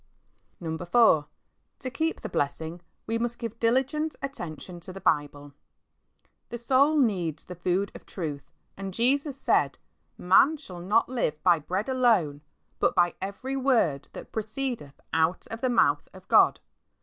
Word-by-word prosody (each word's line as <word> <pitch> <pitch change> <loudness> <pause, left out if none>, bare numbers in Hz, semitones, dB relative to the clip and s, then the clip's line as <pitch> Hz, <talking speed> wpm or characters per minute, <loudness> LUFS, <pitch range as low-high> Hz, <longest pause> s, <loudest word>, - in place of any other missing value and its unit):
IV. 160 -2 -4
To 230 - +1
keep 325 +2 -1
the - - -4
blessing,, 160 0 -2 0.3
ive 230 +1 -1
must 240 0 -2
give 230 -1 -6
diligent 270 +7 +1
attention 175 - -6
to 185 +2 -10
the 195 - -8
Bible, 145 -4 -1 1.0
The 240 - -5
soul 270 +5 +3
needs 185 - 0
the 180 - -7
food 180 +3 -1
of - - -12
truth, 150 -6 -5 0.3
and 195 -1 -6
Jesus 275 +3 +1
said, - - +2 0.3
" - - -45
Man 260 - +5
shall 185 - -10
not 205 +6 +2
live 155 -12 -2
by 175 -3 +5
bread 185 - -3
alone, 220 - +2 0.4
but - - +2
by 175 -1 +3
every 200 +8 -4
word 240 - +1
that - - -9
proceedeth 220 - -4
out 160 +2 +1
of 225 +1 -6
the 255 - +1
mouth 240 - +2
of - - -14
God." - - +5
200 Hz, 150 wpm, -27 LUFS, 170-255 Hz, 1.0 s, Man